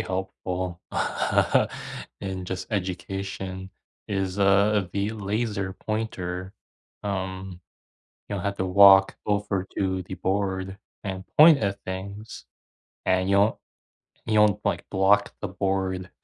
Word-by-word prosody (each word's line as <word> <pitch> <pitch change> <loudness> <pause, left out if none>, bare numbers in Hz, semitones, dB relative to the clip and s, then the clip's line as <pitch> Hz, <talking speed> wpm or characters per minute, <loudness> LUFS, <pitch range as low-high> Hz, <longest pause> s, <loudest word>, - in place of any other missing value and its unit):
helpful, 90 -1 -4
uh, - - +2 0.6
in 95 -2 -4
just, 95 0 -4
education 95 0 -4 0.4
is, 95 -1 -2
uh, 100 0 +4
the 100 +2 0
laser 105 -2 -2
pointer. 95 -4 -4 0.5
Um, 95 -2 -4 0.7
you 100 - -3
don't 95 - -4
have 100 0 -2
to 95 - 0
walk 95 +1 +7
over 100 -2 0
to 95 -1 0
the 95 - -7
board 95 +1 -2 0.3
and 95 -1 -4
point 155 -1 +9
at 100 -1 -2
things, 100 +4 -6 0.6
and 95 0 +2
you 100 - +4
won't 105 +3 +4 0.7
you 110 - +4
won't, 105 -2 +4
like, - - 0
blocked 100 +2 +3
the 105 - -2
board 95 -1 -2
95 Hz, 120 wpm, -26 LUFS, 95-100 Hz, 0.7 s, point